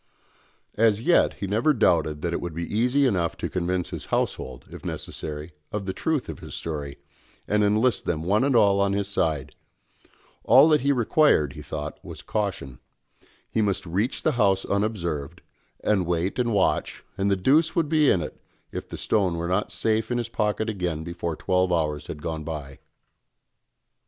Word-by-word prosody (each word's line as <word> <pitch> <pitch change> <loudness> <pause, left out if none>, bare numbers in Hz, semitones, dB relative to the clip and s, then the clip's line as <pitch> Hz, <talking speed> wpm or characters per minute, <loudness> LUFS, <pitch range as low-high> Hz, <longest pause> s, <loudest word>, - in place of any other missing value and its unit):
As 110 -2 +4
yet 170 +10 +3
he - - -4
never 110 +10 +2
doubted 80 - +2
that 85 -1 -1
it - - -2
would 85 -3 -5
be 85 - -3
easy 125 +5 +3
enough 90 -9 0
to - - -3
convince 90 0 -1
his - - -6
household, 65 -2 -2
if - - -10
necessary, 75 +1 -6 0.2
of 105 -2 -3
the 95 - -2
truth 155 +7 -1
of - - -7
his - - -8
story, 75 -3 -5 0.5
and 105 0 +2
enlist 110 +4 +2
them 80 -1 -1
one 105 +7 +2
and 140 -2 +2
all 100 -3 +5
on 100 0 +2
his 100 -1 -1
side; 80 -8 -1 0.9
all 130 +6 +7
that 150 -3 +4
he 140 +2 +2
required, 120 - +3
he 75 - -9
thought, 75 0 -6
was - - -9
caution; 95 - -3 0.7
he 110 - 0
must 100 -2 0
reach 95 +9 -1
the - - +3
house 100 -5 +2
unobserved, 85 -6 -2 0.4
and 95 -5 +2
wait 90 +6 -1
and 120 -1 +1
watch, 100 -3 0
and 100 -1 0
the 100 - +3
deuce 150 - +3
would 165 -3 +2
be 155 -2 +4
in 90 - +3
it 75 - -7 0.3
if - - -6
the - - -6
stone 95 -5 +1
were 85 +1 -2
not 95 +4 0
safe 110 0 0
in 120 - 0
his 120 -1 -2
pocket 105 0 -1
again 90 -7 -2
before 85 -1 -4
twelve 90 +1 +1
hours 75 -4 0
had 75 - -7
gone 80 -2 -3
by. 75 -4 -6
95 Hz, 180 wpm, -25 LUFS, 85-110 Hz, 0.9 s, all